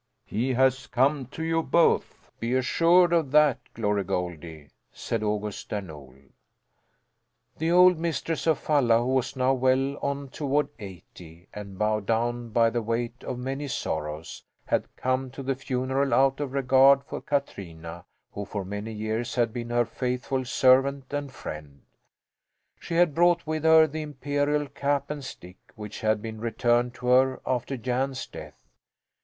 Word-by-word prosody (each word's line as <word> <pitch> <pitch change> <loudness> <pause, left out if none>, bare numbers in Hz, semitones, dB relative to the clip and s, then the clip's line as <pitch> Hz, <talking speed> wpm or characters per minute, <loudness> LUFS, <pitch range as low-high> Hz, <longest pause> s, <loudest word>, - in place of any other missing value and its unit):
"He 125 +5 -1
has 130 +1 +2
come 135 +1 +1
to 160 - -7
you 165 0 +1
both, 165 +3 +1
be 120 +2 -1
assured 170 +7 +4
of 165 -5 +2
that, 150 -5 +5 0.2
Glory 105 -3 0
Goldie!" 85 -4 -5 0.2
said 115 - -3
August 105 -1 -3
Där 105 -2 -3
Nol. 70 -6 -12 1.4
The 160 +1 0
old 180 -1 +6
mistress 165 -1 -2
of 160 - +4
Falla, 130 -7 +3
who 120 - -2
was 130 0 0
now 130 0 +2
well 130 +2 +1
on 140 -1 -3
toward 145 +1 -1
eighty 90 -3 -12
and 100 -2 -8
bowed 105 -1 0
down 120 +1 -1
by 115 +1 +3
the 120 0 -1
weight 115 +2 -3
of 125 - -4
many 135 +3 -4
sorrows, 80 - -4 0.2
had - - 0
come 130 +1 -1
to 135 +2 -8
the 135 +1 0
funeral 130 +1 -1
out 135 0 +3
of 145 -3 -3
regard 135 +1 +5
for - - -7
Katrina, 85 - -4 0.3
who 100 - -5
for 100 -1 -5
many 105 +3 -5
years 110 +2 -3
had 120 -3 +1
been 120 -1 -5
her 120 0 +2
faithful 125 +2 -2
servant 130 +2 +3
and 145 -1 -3
friend. 75 - -9 1.0
She 165 - -5
had 170 -3 +4
brought 175 +2 +3
with 155 0 -3
her 160 0 +7
the 155 0 -5
imperial 145 0 -1
cap 140 +1 -1
and 145 -2 -5
stick, 90 -8 -10 0.2
which 105 -1 -8
had 110 -1 +1
been 110 -1 -7
returned 120 +1 +1
to 125 - -9
her 130 +1 +4
after 130 +1 -2
Jan's 130 +2 -2
death. - - -12
130 Hz, 160 wpm, -26 LUFS, 110-140 Hz, 1.4 s, her